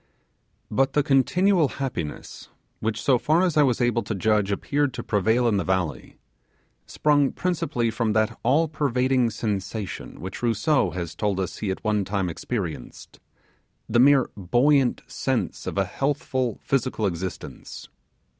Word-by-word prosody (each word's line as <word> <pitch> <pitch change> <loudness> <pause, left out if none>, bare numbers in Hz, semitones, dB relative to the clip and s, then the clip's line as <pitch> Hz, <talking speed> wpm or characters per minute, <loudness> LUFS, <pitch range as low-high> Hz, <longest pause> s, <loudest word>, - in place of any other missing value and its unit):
But 135 0 +1
the 150 - +3
continual 165 +5 +3
happiness, 90 - -5 0.3
which 110 0 -2
so 125 +3 +3
far 160 +7 +2
as 180 -4 +1
I 150 - +5
was 130 -5 +2
able 120 -2 +2
to 110 - -4
judge 105 0 +1
appeared 140 +6 0
to - - -5
prevail 110 +4 +2
in 105 -3 +2
the 95 - 0
valley, 90 -4 -2 0.7
sprang 145 -2 +2
principally 165 -10 -1
from 115 -1 0
that 110 0 0
all 145 +7 +3
pervading 130 -4 +1
sensation 105 -2 -4
which 95 +3 -7
Rousseau 120 +5 +2
has 85 -2 -5
told 100 +1 -1
us 95 -3 -4
be 105 - -2
at 95 - -4
one 105 -2 +1
time 95 -1 -1
experienced, 90 -1 -6 0.7
the 120 - +2
mere 135 0 +5
buoyant 125 +7 +2
sense - - -3
of - - -4
a 100 - +2
healthful 130 -1 -2
physical 130 -4 0
existence. 90 -1 -5
115 Hz, 145 wpm, -24 LUFS, 100-135 Hz, 0.7 s, I